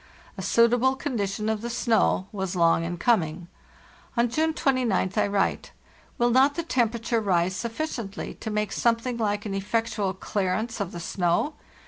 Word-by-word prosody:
A - - -6
suitable 245 +3 +3
condition 215 -7 -2
of 220 -1 0
the 235 - -4
snow 230 -5 +2
was 190 -3 -3
long 165 -1 +3
in 175 +1 -3
coming. 170 -4 +1 0.7
On 235 0 +3
June 320 +5 +1
209th 245 - +1
J - - +1
write: 200 -1 0 0.5
"Will 240 0 +3
not 270 +4 +4
the 335 - -2
temperature 235 -5 0
rise 185 -2 +1
sufficiently 230 -3 -4
to 220 - -7
make 210 -1 -1
something 235 +1 0
hke 205 -1 -1
an 205 - -3
effectual 205 -1 -1
clearance 210 +4 -2
of 195 -3 -2
the 175 - -6
snow? 175 - 0
220 Hz, 155 wpm, -26 LUFS, 190-240 Hz, 0.7 s, not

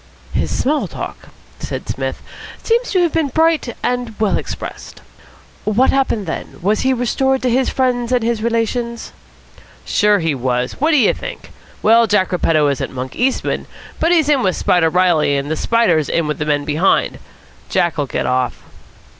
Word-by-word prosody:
"His - - 0
small 295 +2 0
talk," - - -8 0.3
said - - -5
Psmith, - - -4 0.4
"seems 475 +2 +1
to 370 -3 +2
have 335 - 0
been 320 -3 +1
bright 315 -3 +1
and 245 -3 -2
well 215 -2 +2
expressed. - - -6 0.6
What 220 +5 +2
happened 260 -6 0
then? 165 - -6
Was 210 +3 +2
he 260 - +2
restored 265 +2 0
to 250 - +2
his 255 +2 +2
friends 250 -2 0
and 250 -2 +2
his 230 -1 0
relations?" 235 +1 -2 0.7
"Sure, 210 -1 +3
he 165 -4 0
was. 125 -1 -1
What 310 - +3
do 310 - +4
you 240 - +4
think? - - -8 0.3
Well, 230 +1 +5
Jack 205 -3 +2
Repetto 160 -4 +2
isn't 140 -1 -2
Monk 130 0 -6
Eastman, 260 +2 -1 0.3
but 330 - +2
he's 325 -4 +3
in 290 -3 +3
with 185 -5 +1
Spider 170 -2 +2
Reilly, 165 -5 +2
and 140 +2 -3
the - - +1
Spider's 175 -8 +2
in 170 - +1
with 150 0 -3
the 150 - -1
men 145 -1 0
behind. 155 +6 +1 0.5
Jack'll 155 -5 0
get - - -2
off." 125 -1 -1
225 Hz, 170 wpm, -18 LUFS, 160-260 Hz, 0.7 s, Well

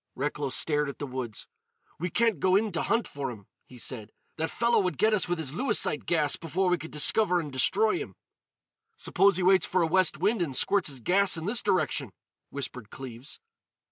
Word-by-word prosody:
Recklow 145 0 -3
stared 150 +2 +1
at 140 - -8
the 145 - -5
woods. 125 -5 -6 0.5
"We 180 +3 -2
can't 230 -4 +1
go 185 +3 +2
in 215 +1 +1
to 170 - -2
hunt 230 +1 0
for 140 -2 -5
him," 105 -5 -10 0.2
he 125 - -14
said. 115 -3 -4 0.3
"That 160 0 -2
fellow 235 0 +1
would 180 -2 -1
get 215 +2 +2
us 210 - +1
with 175 - 0
his 150 -4 -4
Lewisite 165 - +1
gas 155 -4 +2
before 180 +3 -1
we 180 -1 +1
could 160 - -8
discover 180 +4 +3
and 150 -5 -6
destroy 210 +11 +2
him." - - -8 0.8
"Suppose 195 - +2
he 185 - -1
waits 190 +1 +4
for 185 -1 +1
a - - +3
west 170 -1 +2
wind 200 +5 0
and 145 -6 -2
squirts 195 +4 +2
his 135 -3 -5
gas 190 - +2
in 160 - -6
this 235 +5 +1
direction?" 155 - -1 0.4
whispered 125 -5 -7
Cleves. 130 0 -9
165 Hz, 205 wpm, -27 LUFS, 140-195 Hz, 0.8 s, waits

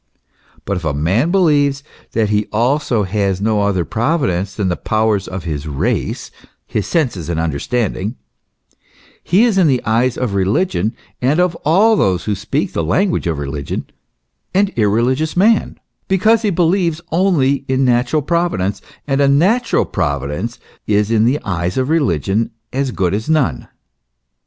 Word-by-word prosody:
But 100 -1 -1
if 90 - -6
a 80 -3 -1
man 95 - +1
believes 145 -7 +2 0.3
that 110 -2 +1
he 105 0 0
also 120 0 +1
has 100 -1 -1
no 105 0 +1
other 95 -4 0
Providence 110 - -1
than 100 -3 -1
the 90 - 0
powers 110 -1 0
of 95 -2 -6
his 75 -3 -4
race 70 -3 -2 0.3
his 105 - -3
senses 120 - -1
and 85 -2 -1
understanding, 100 - -2 1.1
he 190 +6 +3
is 220 -5 +3
in 180 - +4
the 130 -3 +2
eyes 120 +3 +1
of 125 -6 -2
religion, 100 - 0 0.3
and 140 +6 +2
of 180 -1 +2
all 200 +9 +3
those 95 - +1
who 105 - -1
speak 100 +1 -2
the - - -1
language 180 - 0
of 80 -3 -1
religion, 70 0 -4 0.7
an 200 +1 +3
irreligious 120 - +1
man; 215 +3 +2 0.3
because 215 +4 +3
he 215 - +1
believes 170 -2 +1
only 155 -7 +2
in 130 0 +1
a - - +3
natural 125 +4 +2
Pro 170 +3 +1
vidence, 95 - -2 0.3
and 135 0 +1
a 140 - +4
natural 190 - +2
Providence 75 - -3 0.3
is 105 +1 +1
in 110 -1 +3
the 135 +5 +2
eyes 90 0 -2
of 130 +1 0
religion 110 - +1 0.2
as 135 +1 0
good 95 -6 -1
as 110 +6 -3
none. 135 - +1
115 Hz, 160 wpm, -17 LUFS, 95-155 Hz, 1.1 s, in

